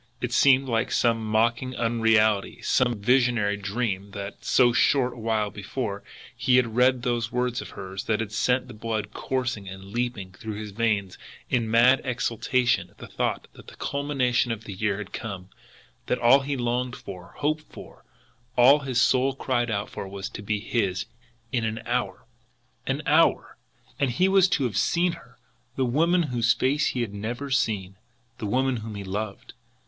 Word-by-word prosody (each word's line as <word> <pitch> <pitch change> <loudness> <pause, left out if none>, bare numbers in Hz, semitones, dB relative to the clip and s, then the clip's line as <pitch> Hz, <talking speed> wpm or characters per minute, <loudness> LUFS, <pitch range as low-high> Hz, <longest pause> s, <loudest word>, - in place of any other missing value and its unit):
It 120 0 -3
seemed 135 0 +5
like 115 -1 0
some 115 -2 +2
mocking 115 +4 +1
unreality, 110 -3 +2
some 125 -2 +2
visionary 120 -2 +2
dream 100 -1 -3
that, 100 0 -7
so 120 -2 +4
short 125 0 +3
a - - -13
while 110 -2 0
before, 100 0 -4 0.3
he 130 +1 +2
had 115 -3 +2
read 125 0 +3
those 120 -2 -1
words 125 0 -1
of - - -9
hers 95 0 -6
that 110 -2 0
had 110 -2 -3
sent 125 +4 +1
the 125 - -10
blood 110 -1 -4
coursing 120 -6 -3
and 95 +1 -9
leaping 120 -5 -3
through 110 +3 -7
his 105 0 -6
veins 105 -3 -1 0.3
in 115 -3 +1
mad 120 +4 +5
exultation 125 0 0
at - - -27
the - - -9
thought - - -2
that - - -15
the - - -12
culmination 135 -4 0
of 115 -1 -4
the 100 - -7
years 100 +1 -1
had 100 -2 -8
come, 95 -4 -6 0.6
that 125 - +1
all 120 +3 +6
he 140 0 -3
longed 125 +1 -1
for, 90 -2 -10
hoped 155 +1 -2
for, - - -12 0.5
that - - -3
all 140 +4 +8
his 130 -4 -1
soul 130 +1 +3
cried 120 -3 -1
out 100 -2 -1
for 100 - -7
was 95 0 -6
to - - -8
be 105 0 -1
his 100 -4 -1 0.5
"in 120 -3 0
an 110 0 -2
hour." 115 -6 -2 0.6
An - - -1
HOUR - - +3 0.4
and 140 - +2
he 180 +10 +2
was 190 -1 +5
to 140 - +1
have 115 -6 -1
seen 175 +7 +2
her, 125 -6 -13 0.4
the 130 - +1
woman 165 +8 +2
whose 120 -6 +1
face 145 +3 +1
he 125 - -1
had 110 -4 -3
never 120 +7 -5
seen, 100 -7 0 0.4
the 105 - -3
woman 130 +3 +1
whom 110 -1 -7
he 100 - -5
loved! 100 +2 -5
120 Hz, 180 wpm, -25 LUFS, 105-130 Hz, 0.6 s, all